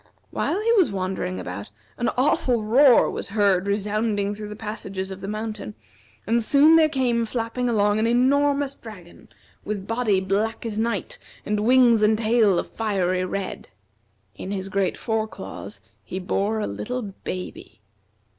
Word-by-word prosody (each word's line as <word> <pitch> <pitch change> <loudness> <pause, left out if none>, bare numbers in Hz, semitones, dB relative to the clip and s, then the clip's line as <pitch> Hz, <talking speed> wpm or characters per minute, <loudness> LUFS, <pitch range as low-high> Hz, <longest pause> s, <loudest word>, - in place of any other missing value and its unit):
While 380 - -1
he 450 +2 +1
was 395 - +4
wandering 185 - -3
about, 95 +3 -6 0.3
an 240 - 0
awful 250 -3 +2
roar 250 +4 +5
was - - -6
heard 200 -3 +2
resounding 205 0 -1
through 210 0 -7
the 210 - -7
passages 200 -3 -5
of 190 0 -8
the 195 - -6
mountain, 215 - -5 0.5
and 230 +3 +2
soon 290 +7 +6
there 315 -1 +5
came 250 -5 +1
flapping 230 +2 -2
along 210 -2 +2
an 225 - +2
enormous 280 +3 +2
dragon, 200 -9 -13 0.3
with 200 -2 -4
body 225 -3 +1
black 205 +5 -1
as 220 -2 -3
night, 235 - -2 0.3
and 210 0 0
wings 240 0 +5
and 215 +1 +4
tail 220 -4 +3
of - - -2
fiery 185 -4 0
red. 195 +1 -5 0.6
In 185 - -8
his 195 -1 -3
great 195 -1 0
fore 220 -1 -1
claws - - -9 0.2
he 185 - -6
bore 200 +3 -1
a - - -1
little 105 - -4
baby. 185 - -7
215 Hz, 155 wpm, -23 LUFS, 195-240 Hz, 0.6 s, soon